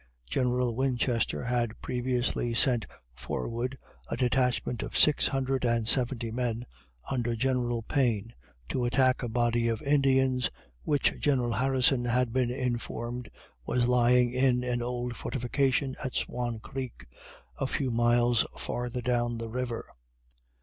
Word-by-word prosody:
General 125 - 0
Winchester 125 -2 0
had 120 -2 -1
previously 125 -1 -1
sent 120 -2 +3 0.3
forward 115 - -4 0.3
a - - -2
detachment 125 -2 +1
of - - -4
six 150 - +5
hundred 135 -1 -1
and 115 -2 +1
seventy 120 -2 +2
men, 120 0 -2 0.5
under 120 -3 0
General 120 -1 0
Payne, 115 -4 0 0.4
to 125 - 0
attack 130 +1 +3
a 120 - -3
body 120 0 +1
of 115 -1 -1
Indians 135 -3 +3 0.3
which 145 -2 +2
General 125 -5 +1
Harrison 130 0 +2
had 120 -1 +1
been 130 -2 +2
informed 120 -1 -3 0.3
was 120 - +1
lying 125 0 +4
in 125 -1 +2
an 125 -1 -1
old 120 0 -3
fortification 135 +2 0
at 130 - -4
Swan 120 -2 -2
creek, 130 +2 -7 0.5
a - - 0
few 130 -1 -1
miles 120 0 +3
farther 125 0 -3
down 120 -1 0
the 115 0 -5
river. 120 0 -3
125 Hz, 130 wpm, -29 LUFS, 120-130 Hz, 0.5 s, six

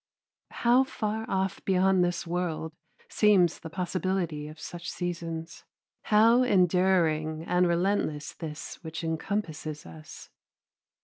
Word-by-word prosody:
How 245 +2 +3
far 220 -4 -3
off 190 -1 -1
beyond 190 -1 +3
this 175 -1 -1
world 170 -2 -3 0.3
seems 195 -6 +3
the 165 - -8
possibility 180 -3 -2
of 155 +1 -11
such 175 +1 -7
seasons, 165 -2 -5 0.4
how 225 +3 +5
enduring 180 -7 +2
and 180 +1 +2
relentless 170 -4 0
this 155 +1 -8
which 160 +1 -6
encompasses 160 -2 -3
us. 80 -2 -12
175 Hz, 110 wpm, -28 LUFS, 160-190 Hz, 0.4 s, how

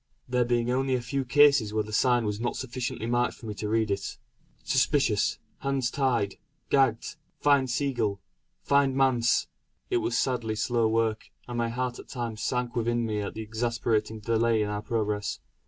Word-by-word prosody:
There 125 -1 +1
being 120 0 +1
only 130 +1 +1
a - - 0
few 130 +3 -2
cases 140 -3 +5
where 110 - +2
the 110 0 -9
sign 120 0 +3
was 105 0 -2
not 120 +1 -2
sufficiently 125 -3 -4
marked 120 +1 +1
for - - -13
me 105 - -4
to 105 +1 -4
read 110 -1 +1
it. 100 0 -3 0.5
"Suspicious. 115 -9 +2 0.2
Hands 135 -3 -1
tied 120 -8 0 0.3
gagged 130 -5 +2 0.2
find 140 -3 +3
Seagull 120 -6 0 0.4
find 140 -1 +3
Manse." 125 -3 +3 0.5
It 370 - +3
was 350 0 0
sadly 120 -4 0
slow 115 +1 +1
work, 110 0 0 0.2
and 120 -1 -4
my 115 0 0
heart 125 +1 -3
at - - -11
times 115 -3 -5
sank 125 0 -1
within 120 0 0
me 105 -2 -1
at 100 - -5
the 110 - -4
exasperating 110 -1 -1
delay 115 0 +2
in 105 - -2
our 105 0 -3
progress. 105 -2 -2
120 Hz, 175 wpm, -27 LUFS, 110-130 Hz, 0.5 s, cases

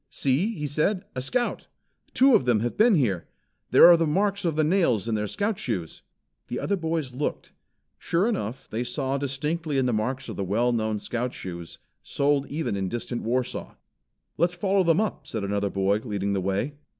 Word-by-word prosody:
"See!" 160 - 0
he 150 - -4
said. 155 +7 0
"A 130 - -3
Scout! 240 - -1 0.5
Two 265 +1 +6
of 135 - +4
them 120 -4 +3
have 120 +1 -2
been 220 0 +5
here. 105 - 0 0.4
There - - +8
are 175 - +9
the 165 -1 +1
marks 195 +5 0
of 165 -3 0
the 155 - +2
nails 155 - +2
in 115 - 0
their 105 -1 -1
Scout 205 - -2
shoes." 95 -10 -4 0.5
The - - -3
other 200 - 0
boys 160 -6 -2
looked. 140 +4 -3 0.5
Sure 175 +6 +1
enough 130 - -3
they 115 +3 -3
saw 135 +2 -2
distinctly 145 +2 -2
the 125 -2 +1
marks 125 +5 -2
of - - -6
the 100 - -1
well 115 +6 +1
known 110 -2 0
Scout 120 +4 -3
shoes, 85 -2 -7 0.2
sold 140 0 0
even 150 -8 -2
in 95 -1 -2
distant 120 +2 -4
Warsaw. 125 +2 -2 0.6
"Let's 175 +1 +2
follow 190 +1 +2
them 165 0 +3
up," 215 -2 -2
said 110 -3 -4
another 100 0 -1
boy, 95 +1 +1
leading 100 -3 -2
the 95 - 0
way. 100 +9 -1
130 Hz, 190 wpm, -26 LUFS, 110-170 Hz, 0.6 s, are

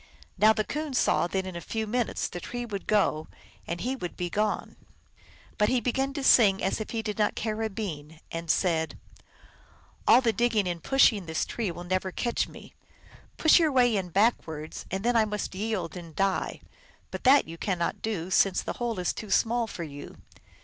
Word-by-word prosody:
Now 215 +1 +6
the 220 -1 +1
Coon 300 +2 -4
saw 250 - +2
that 190 +1 -2
in 185 -2 -6
a 170 - -5
few 220 +4 -3
minutes 240 +2 -1
the 175 - -7
tree 245 +6 -5
would 200 -4 -6
go 180 -7 +2 0.4
and 170 +1 -4
he 255 +3 -1
be 175 -7 -5
gone. 210 +1 -1 0.8
But 210 - +4
he 255 - +2
began 265 +3 -1
to 280 -1 -4
sing 200 -7 +5
as 195 +3 0
if 215 - -5
he 225 -1 -3
did 210 0 -4
not 210 - +2
care 220 0 -2
a 220 - 0
bean, 160 -7 -6
and 165 0 -5
said, 160 -2 +1 0.6
" - - -30
All - - +8
the 235 -3 +1
digging 220 -2 +1
and 175 -2 -3
pushing 220 -7 +3
this 160 0 -1
tree 225 -5 -3
will 175 +1 -7
never 185 +1 -1
catch 235 +5 -1
me. - - -13 0.6
Push 315 +2 +6
your 320 -3 +3
way 245 -4 +4
in 190 -3 -2
backwards, 165 -6 -1
and 190 +3 -3
then 240 0 +2
I 225 -1 +5
must 210 -3 -4
yield 200 -3 -3
and 170 -3 -9
die. 195 -1 -1 0.5
But - - -6
that 275 +3 +6
you 165 +1 -9
cannot 175 -4 -2
do, 190 -5 -3
since 195 0 +3
the - - -3
hole 235 -3 -1
is 180 -1 -1
too 215 - -8
small 230 +4 +2
for 175 - -6
you." 145 -2 -9
210 Hz, 200 wpm, -27 LUFS, 175-235 Hz, 0.8 s, All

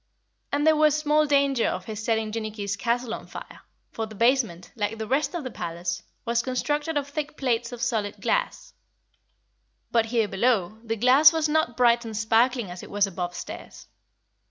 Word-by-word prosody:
And 290 +1 +1
there 315 0 +6
was 305 -1 +4
small 305 0 +2
danger 280 -4 +2
of - - -3
his 220 -1 -6
setting 220 -1 0
Jinnicky's 215 -2 -3
castle 235 +1 -1
on - - -7
fire, - - -10 0.3
for 225 -1 -4
the 215 - -11
basement, 230 -6 +1
like 215 0 -2
the 220 - -4
rest 275 +7 0
of 340 - -3
the 255 - -5
palace, 170 -1 -4 0.2
was 235 0 +1
constructed 295 +5 -1
of 285 -1 -1
thick 300 +1 -5
plates 245 -2 -1
of 245 0 -5
solid 220 -5 -1
glass. - - -1 1.2
But 230 -1 +2
here 225 -2 +1
below, 215 -1 0
the 225 -1 -2
glass 255 +8 +6
was 320 -1 0
not 300 -6 0
bright 240 -1 +4
and 220 -2 -6
sparkling 225 0 +2
as 180 - -8
it - - -11
was 205 0 +2
above 180 -2 -5
stairs. - - -9
235 Hz, 180 wpm, -25 LUFS, 215-280 Hz, 1.2 s, there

